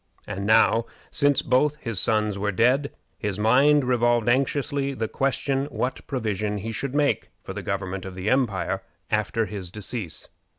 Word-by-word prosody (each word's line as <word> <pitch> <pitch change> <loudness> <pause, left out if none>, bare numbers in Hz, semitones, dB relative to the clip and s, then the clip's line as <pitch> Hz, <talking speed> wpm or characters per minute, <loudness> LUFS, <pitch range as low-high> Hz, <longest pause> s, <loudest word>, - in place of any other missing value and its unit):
And 100 +1 -4
now, 115 +1 +4 0.2
since 145 -1 +3
both 145 +3 +2
his 115 -9 -2
sons 105 -2 +2
were 105 +1 0
dead, 125 +7 +2 0.3
his 105 -4 -2
mind 135 +7 +4
revolved 120 -2 +2
anxiously 140 +2 +1
the 110 -3 -2
question 135 +1 0
what 135 -3 -4
provision 105 -5 -2
he 110 +3 -4
should 135 +4 -4
make 145 -1 +1
for - - -6
the - - -5
government 95 -1 -3
of 95 -1 -7
the 95 +2 -5
empire 115 -6 +1 0.3
after 110 +1 +1
his 100 -4 -5
decease. 100 -4 -5
115 Hz, 160 wpm, -25 LUFS, 105-135 Hz, 0.3 s, now